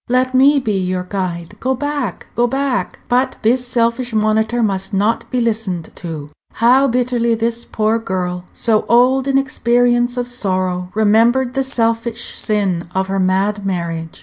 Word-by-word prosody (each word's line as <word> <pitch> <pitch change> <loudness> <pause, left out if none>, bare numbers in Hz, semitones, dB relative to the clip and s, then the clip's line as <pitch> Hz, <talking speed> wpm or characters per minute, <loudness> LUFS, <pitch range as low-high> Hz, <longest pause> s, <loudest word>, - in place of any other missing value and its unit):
Let 255 +1 +1
me 275 +3 +5
be 215 -7 0
your 185 0 -2
guide. 180 -1 -4
Go 260 +1 0
back, 285 -6 -3
go 240 0 +2
back!" 270 0 -2
But 255 +2 +1
this 245 +3 +2
selfish 240 0 0
monitor 220 +2 +1
must 195 -1 -1
not 210 +4 0
be 250 - -1
listened 215 -8 -2
to. 155 -4 -7 0.2
How 255 +4 +4
bitterly 240 -2 +1
this 230 +1 -2
poor 220 +1 0
girl, 180 -4 -3
so 220 -2 +1
old 255 +3 +4
in 270 0 +2
experience 245 -2 +1
of 245 0 -1
sorrow, 185 -6 -2
remembered 230 +4 +3
the 270 0 0
selfish 230 -2 -1
sin 190 -6 -1
of 190 0 0
her 195 0 -1
mad 195 +2 +1
marriage! 170 -4 -4
230 Hz, 155 wpm, -17 LUFS, 190-245 Hz, 0.2 s, me